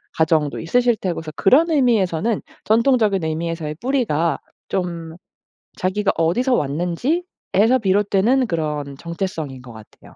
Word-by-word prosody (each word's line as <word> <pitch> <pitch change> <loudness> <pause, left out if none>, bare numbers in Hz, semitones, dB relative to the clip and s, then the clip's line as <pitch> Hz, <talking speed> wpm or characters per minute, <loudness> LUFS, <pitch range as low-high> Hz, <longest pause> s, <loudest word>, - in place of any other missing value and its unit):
가정도 155 -2 +1
있으실 240 +7 +2
테고 185 -5 -3
그래서 155 -1 -7
그런 315 - +4
의미에서는 225 - +1 0.2
전통적인 220 -5 +3
의미에서의 160 -1 -3
뿌리가 170 - 0 0.3
좀 170 -3 -3 0.6
자기가 195 +2 0
어디서 245 +11 +2
왔는지에서 210 - 0
비롯되는 205 +6 +2
그런 150 -5 -3
정체성인 165 -5 -5
것 125 -2 -12
같아요. 110 -1 -16
185 Hz, 330 characters per minute, -21 LUFS, 160-235 Hz, 0.6 s, 그런